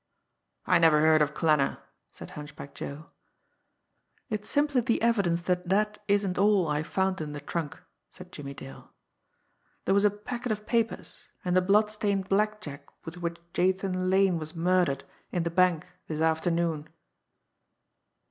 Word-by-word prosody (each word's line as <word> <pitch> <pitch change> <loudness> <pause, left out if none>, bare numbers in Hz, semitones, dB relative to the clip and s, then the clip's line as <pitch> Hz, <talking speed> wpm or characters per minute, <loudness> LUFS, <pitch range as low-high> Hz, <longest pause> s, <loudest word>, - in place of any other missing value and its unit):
"I 180 - +4
never 160 -2 +5
heard 155 0 +5
of 150 0 +1
Klanner," 150 -4 +2 0.3
said - - -11
Hunchback 145 -1 -9
Joe. 145 +3 -8 1.2
"It's 210 -1 -3
simply 290 -3 +2
the 230 0 +1
evidence 200 -7 +2
that 180 0 -1
that 210 +2 +1
isn't 200 -2 +1
all 200 -3 +4
I 150 0 0
found 190 +3 -1
in 150 -1 -5
the 145 - -5
trunk," 150 +1 -4 0.3
said - - -13
Jimmie 140 -1 -8
Dale. 135 0 -11 0.9
"There 190 - +2
was 200 +1 +4
a 210 - +6
packet 235 +4 -5
of 210 0 -3
papers, 230 -1 -2 0.2
and 180 0 +1
the 185 - +5
blood 210 +3 +3
stained 200 -3 -1
blackjack 195 -9 -1 0.2
with 165 +2 -7
which 170 -1 -3 0.2
Jathan 185 0 0
Lane 190 -2 +3
was 155 +2 -7
murdered 175 -5 +1 0.3
in 175 - 0
the 170 - -2
bank 180 -1 +3 0.2
this 155 -1 -4
afternoon." 160 -1 0
180 Hz, 150 wpm, -28 LUFS, 160-205 Hz, 1.2 s, a